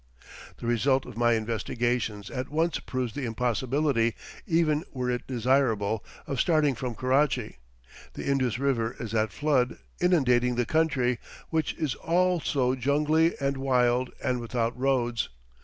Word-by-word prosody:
The -, -, -8 dB
result 130 Hz, +3 st, +2 dB
of -, -, -10 dB
my 120 Hz, 0 st, +3 dB
investigations 115 Hz, -1 st, -1 dB
at 130 Hz, +1 st, -4 dB
once 160 Hz, +3 st, 0 dB
proves 125 Hz, -4 st, -3 dB
the 140 Hz, 0 st, -3 dB
impossibility, 125 Hz, +1 st, 0 dB, 0.3 s
even 160 Hz, -2 st, +2 dB
were 125 Hz, -2 st, -2 dB
it 120 Hz, -1 st, -3 dB
desirable, 115 Hz, -4 st, +1 dB, 0.2 s
of 135 Hz, -, -3 dB
starting 155 Hz, -3 st, +3 dB
from 125 Hz, -1 st, -4 dB
Karachi. 130 Hz, -, +1 dB, 0.6 s
The -, -, -6 dB
Indus 130 Hz, -5 st, +1 dB
River 125 Hz, -4 st, 0 dB
is 115 Hz, -2 st, -5 dB
at 110 Hz, -1 st, +1 dB
flood, 140 Hz, -5 st, +1 dB, 0.2 s
inundating 125 Hz, -9 st, +3 dB
the 120 Hz, 0 st, +1 dB
country, 130 Hz, -5 st, +1 dB, 0.3 s
which 160 Hz, -2 st, 0 dB
is 150 Hz, -5 st, -1 dB
also 165 Hz, -7 st, +1 dB
jungly 150 Hz, +5 st, +2 dB
and 140 Hz, -1 st, 0 dB
wild 125 Hz, -2 st, +2 dB
and 125 Hz, -1 st, 0 dB
without 115 Hz, 0 st, -1 dB
roads. 125 Hz, -3 st, 0 dB
125 Hz, 140 wpm, -27 LUFS, 120-140 Hz, 0.6 s, my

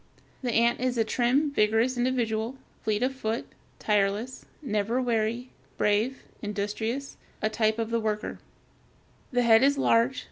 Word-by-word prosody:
The 250 Hz, -2 st, -1 dB
ant 235 Hz, +1 st, +3 dB
is 255 Hz, 0 st, 0 dB
a 225 Hz, -, +4 dB
trim, 255 Hz, +6 st, +1 dB
vigorous 225 Hz, +1 st, +2 dB
individual, 240 Hz, -1 st, -1 dB, 0.3 s
fleet 215 Hz, +1 st, 0 dB
of 260 Hz, +1 st, +1 dB
foot, 230 Hz, -3 st, -3 dB, 0.3 s
tireless, 210 Hz, +4 st, 0 dB, 0.2 s
never 220 Hz, 0 st, 0 dB
weary, 235 Hz, 0 st, -1 dB, 0.3 s
brave, 215 Hz, +6 st, +1 dB, 0.2 s
industrious, 215 Hz, +6 st, -3 dB, 0.2 s
a 215 Hz, -, 0 dB
type 220 Hz, 0 st, +1 dB
of 225 Hz, 0 st, -2 dB
the 230 Hz, -, +1 dB
worker. 215 Hz, -1 st, -3 dB, 0.9 s
The 245 Hz, -1 st, +2 dB
head 225 Hz, -1 st, +6 dB
is 280 Hz, +1 st, +4 dB
large. 250 Hz, 0 st, +3 dB
230 Hz, 140 wpm, -27 LUFS, 215-255 Hz, 0.9 s, head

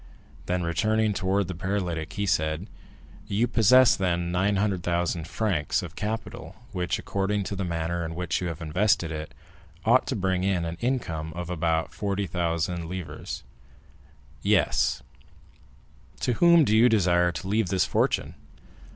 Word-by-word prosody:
Then, 90 Hz, 0 st, 0 dB
turning 110 Hz, +3 st, +1 dB
towards 95 Hz, 0 st, 0 dB
the 95 Hz, -, -4 dB
paralytic, 90 Hz, -3 st, -3 dB
he 100 Hz, -, -2 dB
said, 80 Hz, -2 st, 0 dB, 0.6 s
"You 105 Hz, +4 st, +1 dB
possess, 120 Hz, +2 st, +6 dB
then, 85 Hz, -2 st, -1 dB
900,000 90 Hz, -3 st, 0 dB
francs 90 Hz, -5 st, -1 dB
of -, -, -8 dB
capital, 110 Hz, +2 st, -5 dB, 0.2 s
which, 90 Hz, -4 st, -1 dB
according 100 Hz, +1 st, -1 dB
to 100 Hz, -, -4 dB
the 100 Hz, -, -2 dB
manner 85 Hz, 0 st, -2 dB
in 80 Hz, 0 st, -5 dB
which 90 Hz, +1 st, -2 dB
you 90 Hz, -, -2 dB
have 85 Hz, -1 st, -5 dB
invested 85 Hz, +1 st, +1 dB
it, 75 Hz, -1 st, -5 dB, 0.5 s
ought -, -, +4 dB
to -, -, -1 dB
bring 95 Hz, -1 st, 0 dB
in 95 Hz, -3 st, +1 dB
an 85 Hz, 0 st, -4 dB
income 85 Hz, -11 st, -2 dB
of 90 Hz, 0 st, -5 dB
about 80 Hz, -1 st, 0 dB
40,000 90 Hz, -4 st, -2 dB
livres?" 85 Hz, -5 st, -6 dB, 1.0 s
"Yes." -, -, +2 dB, 1.2 s
"To 125 Hz, -, +1 dB
whom 170 Hz, +4 st, +6 dB
do 110 Hz, -, +2 dB
you 120 Hz, +3 st, +6 dB
desire 90 Hz, -5 st, +3 dB
to 90 Hz, -, -6 dB
leave 105 Hz, 0 st, +1 dB
this 95 Hz, -1 st, +2 dB
fortune?" -, -, 0 dB
90 Hz, 140 wpm, -26 LUFS, 85-105 Hz, 1.2 s, possess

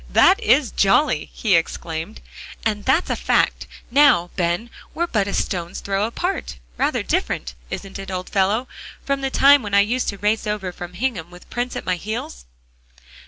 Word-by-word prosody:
"That -, -, +5 dB
is 250 Hz, +3 st, +3 dB
jolly," 195 Hz, -, +2 dB
he 210 Hz, -5 st, +1 dB
exclaimed, 165 Hz, +3 st, -3 dB, 0.4 s
"and 210 Hz, -2 st, -1 dB
that's 290 Hz, +7 st, +2 dB
a -, -, +1 dB
fact! -, -, +1 dB, 0.2 s
Now, 245 Hz, -11 st, +5 dB
Ben, 175 Hz, +6 st, -1 dB, 0.2 s
we're 340 Hz, -, +1 dB
but 210 Hz, -, 0 dB
a 200 Hz, -, -3 dB
stone's 175 Hz, -2 st, -2 dB
throw 200 Hz, +1 st, -1 dB
apart. 290 Hz, -, -3 dB, 0.2 s
Rather -, -, 0 dB
different, -, -, -2 dB, 0.2 s
isn't 195 Hz, 0 st, -6 dB
it, 195 Hz, 0 st, -7 dB
old 185 Hz, -1 st, -4 dB
fellow, 205 Hz, +6 st, +1 dB, 0.4 s
from 275 Hz, 0 st, -1 dB
the 270 Hz, -, -1 dB
time 280 Hz, +1 st, +6 dB
when 205 Hz, -3 st, -2 dB
I 200 Hz, -, +7 dB
used 240 Hz, +5 st, 0 dB
to 200 Hz, -, -5 dB
race 210 Hz, +2 st, 0 dB
over 205 Hz, -3 st, -2 dB
from 175 Hz, 0 st, -9 dB
Hingham 200 Hz, -7 st, -2 dB
with 180 Hz, 0 st, -15 dB
Prince 245 Hz, +1 st, -3 dB
at -, -, -5 dB
my 185 Hz, -1 st, 0 dB
heels?" 170 Hz, -, -6 dB
200 Hz, 175 wpm, -21 LUFS, 180-245 Hz, 0.4 s, I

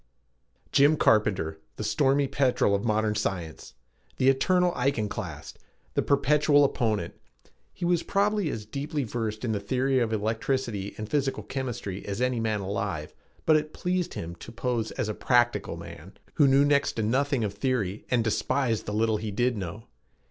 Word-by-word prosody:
Jim 145 Hz, +2 st, +5 dB
Carpenter, 95 Hz, -, +2 dB, 0.2 s
the -, -, -5 dB
stormy 140 Hz, 0 st, +2 dB
petrel 135 Hz, -6 st, +2 dB
of 100 Hz, 0 st, 0 dB
modern 110 Hz, -1 st, +1 dB
science! 90 Hz, -10 st, -4 dB, 0.4 s
The 130 Hz, 0 st, +4 dB
eternal 180 Hz, +6 st, +3 dB
iconoclast: 125 Hz, -5 st, -3 dB, 0.3 s
the -, -, +2 dB
perpetual 145 Hz, +1 st, +4 dB
opponent! 110 Hz, -9 st, 0 dB, 0.6 s
He 175 Hz, -, -5 dB
was 175 Hz, -1 st, +2 dB
probably 200 Hz, -3 st, +1 dB
as 110 Hz, -6 st, -5 dB
deeply 140 Hz, +5 st, -3 dB
versed 110 Hz, -1 st, -3 dB
in 115 Hz, -, 0 dB
the 105 Hz, -, 0 dB
theory 130 Hz, +6 st, +1 dB
of 115 Hz, -2 st, 0 dB
electricity 110 Hz, -1 st, -2 dB
and 110 Hz, -, -5 dB
physical 135 Hz, -4 st, -1 dB
chemistry 120 Hz, -5 st, -4 dB
as 100 Hz, +2 st, -4 dB
any 125 Hz, -1 st, +1 dB
man 110 Hz, -2 st, -1 dB
alive, 95 Hz, -5 st, -3 dB, 0.3 s
but 155 Hz, -, +5 dB
it 155 Hz, 0 st, 0 dB
pleased 180 Hz, -1 st, -2 dB
him 85 Hz, +1 st, -5 dB
to 115 Hz, -, -10 dB
pose 115 Hz, -1 st, -2 dB
as 130 Hz, -5 st, -2 dB
a 110 Hz, -, -2 dB
"practical" 120 Hz, +1 st, +1 dB
man 85 Hz, +7 st, -10 dB, 0.2 s
who 145 Hz, -, +4 dB
knew 135 Hz, +1 st, +5 dB
next 140 Hz, -1 st, +2 dB
to 110 Hz, -, -2 dB
nothing 135 Hz, +3 st, +1 dB
of 100 Hz, -2 st, -2 dB
theory 105 Hz, -4 st, -1 dB
and 125 Hz, -2 st, +2 dB
who -, -, -1 dB
despised 115 Hz, +1 st, 0 dB
the 105 Hz, -, -3 dB
little 110 Hz, 0 st, +2 dB
he 110 Hz, 0 st, -4 dB
did 120 Hz, +4 st, +1 dB
know. 100 Hz, +2 st, -6 dB
120 Hz, 170 wpm, -27 LUFS, 105-140 Hz, 0.6 s, Jim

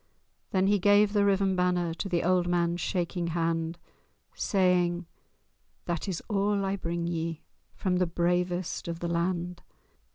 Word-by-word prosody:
Then 190 Hz, 0 st, +2 dB
he 205 Hz, +1 st, +3 dB
gave 205 Hz, +2 st, +4 dB
the 205 Hz, -1 st, +3 dB
riven 195 Hz, -1 st, +2 dB
banner 180 Hz, -2 st, +1 dB
To 195 Hz, +4 st, -4 dB
the 175 Hz, -2 st, +1 dB
old 180 Hz, 0 st, +2 dB
man's 175 Hz, 0 st, +1 dB
shaking 175 Hz, 0 st, -1 dB
hand, 165 Hz, 0 st, -1 dB, 0.6 s
Saying—"That 175 Hz, -2 st, -2 dB
is 185 Hz, -4 st, -3 dB
all 200 Hz, -1 st, +1 dB
I 195 Hz, 0 st, 0 dB
bring 170 Hz, -2 st, -3 dB
ye 165 Hz, -1 st, -3 dB, 0.3 s
From 185 Hz, -2 st, 0 dB
the 180 Hz, -1 st, +2 dB
bravest 175 Hz, +1 st, -1 dB
of 170 Hz, -1 st, -3 dB
the 170 Hz, -, -3 dB
land! 175 Hz, +1 st, -1 dB
175 Hz, 140 wpm, -28 LUFS, 170-190 Hz, 0.6 s, gave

